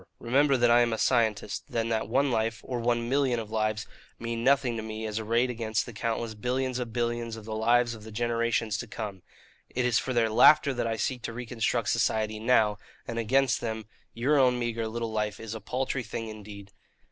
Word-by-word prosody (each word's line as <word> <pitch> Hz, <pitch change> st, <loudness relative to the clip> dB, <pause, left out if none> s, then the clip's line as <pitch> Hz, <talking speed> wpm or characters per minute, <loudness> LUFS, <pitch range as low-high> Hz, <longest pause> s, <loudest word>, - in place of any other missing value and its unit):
Remember 135 Hz, +3 st, +3 dB
that 120 Hz, -1 st, +4 dB
I 120 Hz, +1 st, +6 dB
am 120 Hz, -1 st, +2 dB
a -, -, -1 dB
scientist, 110 Hz, -4 st, +1 dB
and 115 Hz, 0 st, -1 dB
that 110 Hz, -2 st, -1 dB
one 135 Hz, +3 st, +2 dB
life, 110 Hz, -1 st, 0 dB
or 125 Hz, -2 st, -3 dB
one 120 Hz, 0 st, 0 dB
million 130 Hz, -2 st, +1 dB
of 110 Hz, -1 st, -7 dB
lives, 110 Hz, -1 st, 0 dB, 0.3 s
mean 115 Hz, 0 st, -4 dB
nothing 135 Hz, -2 st, +3 dB
to -, -, -3 dB
me 110 Hz, 0 st, -5 dB
as 110 Hz, 0 st, -2 dB
arrayed 115 Hz, +3 st, +1 dB
against 110 Hz, -2 st, -1 dB
the 120 Hz, -, -9 dB
countless 115 Hz, +1 st, -2 dB
billions 125 Hz, +3 st, -2 dB
of 120 Hz, -2 st, -4 dB
billions 120 Hz, -1 st, -2 dB
of 110 Hz, -2 st, -10 dB
the 110 Hz, -, -5 dB
lives 120 Hz, +2 st, +3 dB
of 110 Hz, -2 st, -10 dB
the 110 Hz, -, -10 dB
generations 115 Hz, -1 st, 0 dB
to 120 Hz, -, -5 dB
come. 105 Hz, -4 st, -6 dB, 0.5 s
It 125 Hz, 0 st, -1 dB
is 125 Hz, -1 st, +3 dB
for 130 Hz, -, -3 dB
their 115 Hz, -3 st, +2 dB
laughter 145 Hz, +5 st, +6 dB
that 120 Hz, -2 st, -1 dB
I 115 Hz, -, -1 dB
seek 125 Hz, +2 st, -2 dB
to 115 Hz, -, -5 dB
reconstruct 120 Hz, 0 st, -1 dB
society 110 Hz, -1 st, +1 dB
now; 110 Hz, -3 st, +3 dB, 0.3 s
and 115 Hz, 0 st, -3 dB
against 130 Hz, +2 st, +2 dB
them 110 Hz, -2 st, -4 dB, 0.3 s
your 140 Hz, +5 st, +2 dB
own 125 Hz, -2 st, +4 dB
meagre 115 Hz, -2 st, -2 dB
little 115 Hz, 0 st, -3 dB
life 105 Hz, -1 st, -2 dB
is 115 Hz, -1 st, -6 dB
a 110 Hz, -, -6 dB
paltry 130 Hz, +4 st, -2 dB
thing 115 Hz, 0 st, -5 dB
indeed. 105 Hz, -2 st, -10 dB
115 Hz, 210 wpm, -28 LUFS, 110-125 Hz, 0.5 s, I